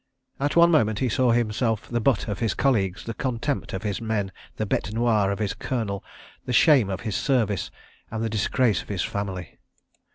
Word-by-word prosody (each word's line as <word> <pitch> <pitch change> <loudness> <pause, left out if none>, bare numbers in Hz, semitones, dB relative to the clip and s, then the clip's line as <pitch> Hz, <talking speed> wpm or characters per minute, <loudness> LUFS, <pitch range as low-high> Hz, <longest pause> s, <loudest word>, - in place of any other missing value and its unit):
At 145 +1 0
one 170 0 +6
moment 110 -9 +3
he 130 +2 0
saw 125 +2 +2
himself 115 -1 +1
the 120 - -1
butt 115 -2 +2
of 100 -4 -3
his 115 - 0
colleagues, 100 -8 +1
the 115 - -5
contempt 130 +4 -2
of 95 +1 -4
his 105 +1 -2
men, 110 -4 -1 0.2
the 110 - -2
bête 105 - -1
noir 110 -3 +2
of 100 - -1
his 105 -2 -1
Colonel, 110 -6 -3 0.4
the 125 - -2
shame 130 - +5
of 95 -1 -3
his 110 - -3
Service, 110 - +1 0.4
and 110 0 -3
the - - +1
disgrace 110 -1 +1
of - - -15
his 95 -4 -1
family. 95 -4 -5
110 Hz, 195 wpm, -25 LUFS, 100-125 Hz, 0.4 s, one